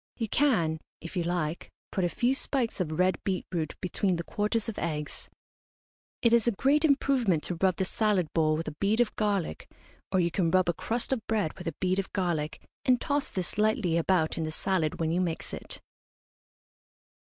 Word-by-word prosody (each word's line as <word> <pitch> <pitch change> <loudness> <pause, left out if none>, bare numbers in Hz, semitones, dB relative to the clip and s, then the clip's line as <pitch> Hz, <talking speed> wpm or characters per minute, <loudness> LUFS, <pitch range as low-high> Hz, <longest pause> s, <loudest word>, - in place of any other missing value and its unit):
You 225 - -1
can, 195 - +2 0.2
if 170 - -8
you 180 - +1
like, 170 -2 -2 0.2
put 190 - 0
a 175 - +2
few 240 +8 +1
spikes 265 -5 -1
of 155 -4 -2
red 185 +1 +2
beet 190 -2 -1
root 160 -4 -2
between 185 +1 +1
the 170 - -3
quarters 210 +4 -1
of 225 - -4
eggs. 150 -3 -4 0.9
It 235 -1 +5
is 235 -1 +4
a - - +5
great 280 +9 +3
improvement 270 - +3
to 175 - -3
rub 190 -2 +4
the 190 - 0
salad 205 -2 +1
bowl 155 -2 +3
with 165 - -4
a - - -4
bead 205 +3 +2
of 240 -3 +2
garlic, 200 - -1 0.4
or 190 - +3
you 170 -1 +2
can 170 -1 +1
rub 185 +1 +3
a - - +3
crust 235 +9 -1
of 250 - -1
bread 210 -8 0
with 180 - -8
a 165 - -3
bead 185 +1 +1
of 195 - -3
garlic, 170 -5 -1 0.2
and 250 -2 +4
toss 285 0 0
this 185 +2 -3
lightly 210 -5 +2
about 170 -1 +2
in - - 0
the 155 - -2
salad 160 -1 -1
when 160 -1 +1
you 175 +2 +1
mix 170 -3 -3
it. - - -4
185 Hz, 200 wpm, -29 LUFS, 165-220 Hz, 0.9 s, It